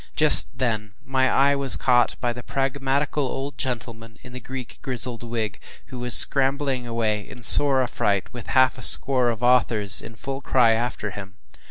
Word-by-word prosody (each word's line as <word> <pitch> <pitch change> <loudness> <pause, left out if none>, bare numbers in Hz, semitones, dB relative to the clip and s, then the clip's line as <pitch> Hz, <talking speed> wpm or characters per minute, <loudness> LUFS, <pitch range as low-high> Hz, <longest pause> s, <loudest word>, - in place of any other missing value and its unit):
Just - - +2
then 110 -4 -3
my 130 -1 0
eye 140 +1 +2
was 140 -2 +3
caught 125 -1 +1
by 120 -1 -2
the 125 - -9
pragmatical 135 +3 -2
old 135 +2 -6
gentleman 115 -2 -6
in 125 - -13
the 125 - -8
Greek 130 0 -9
grizzled 125 -2 -2
wig, 115 -3 -5 0.3
who 130 -2 -9
was 125 -1 +2
scrambling 135 -2 +1
away 110 -2 -2
in 125 - -13
sore 135 +1 +6
affright 100 -5 -2
with 120 -2 -10
half 130 0 +2
a - - -10
score 125 +2 +3
of 115 0 -5
authors 115 -5 +4
in 115 - -12
full 135 +3 -7
cry 125 -4 +2
after 115 -2 -3
him. 95 0 -10
125 Hz, 175 wpm, -22 LUFS, 115-135 Hz, 0.3 s, sore